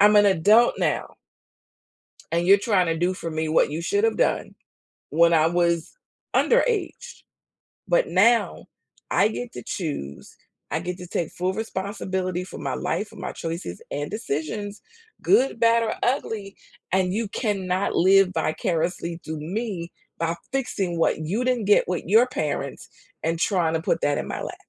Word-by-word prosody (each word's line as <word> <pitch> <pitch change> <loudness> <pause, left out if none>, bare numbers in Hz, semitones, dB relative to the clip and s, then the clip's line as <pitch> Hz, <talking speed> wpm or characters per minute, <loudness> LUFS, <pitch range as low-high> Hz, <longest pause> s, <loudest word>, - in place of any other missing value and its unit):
I'm 210 +1 +7
an 205 - +7
adult 205 +6 +5
now - - -1 1.2
and 170 +1 0
you're 200 +1 +8
trying 200 -3 +2
to 165 -1 -1
do 180 +2 +1
for 170 -2 -6
me 160 0 -2
what 155 - +3
you 155 +3 -4
should 405 - 0
have 455 - 0
done - - 0 0.6
when 170 +2 +4
I 160 -1 +4
was 170 -1 +1 0.4
underaged. 480 0 +1 0.6
But - - +2
now, 230 +5 +3 0.5
I - - +4
get 240 +2 -6
to - - -8
choose, 140 - -5 0.4
I 160 - -1
get 180 +1 -4
to 180 - -8
take 170 -1 -2
full 185 +1 -2
responsibility 190 -3 -3
for 180 - -9
my - - -3
life, 190 +4 -2
for 215 - -15
my 190 - -5
choices 165 - -5
and 145 +1 -3
decisions, 205 +1 -4 0.4
good, 270 - +3
bad, 230 0 +4
or 220 - -1
ugly, 220 -6 -2 0.3
and 185 -1 +1
you 220 +2 -1
cannot 195 -3 -1
live 190 +1 +5
vicariously 170 +1 -1
through 155 -1 -5
me 180 0 -4 0.3
by 165 0 0 0.2
fixing 195 -10 -2
what 165 - +2
you 185 +10 -2
didn't 250 -4 0
get 205 - +5
with 180 -2 -2
your 220 +7 +5
parents 155 - -4 0.3
and 165 +1 -1
tryna 165 -3 +1
put - - +1
that 145 - +1
in - - -3
my - - -4
lap. - - -5
185 Hz, 165 wpm, -24 LUFS, 165-220 Hz, 1.2 s, you're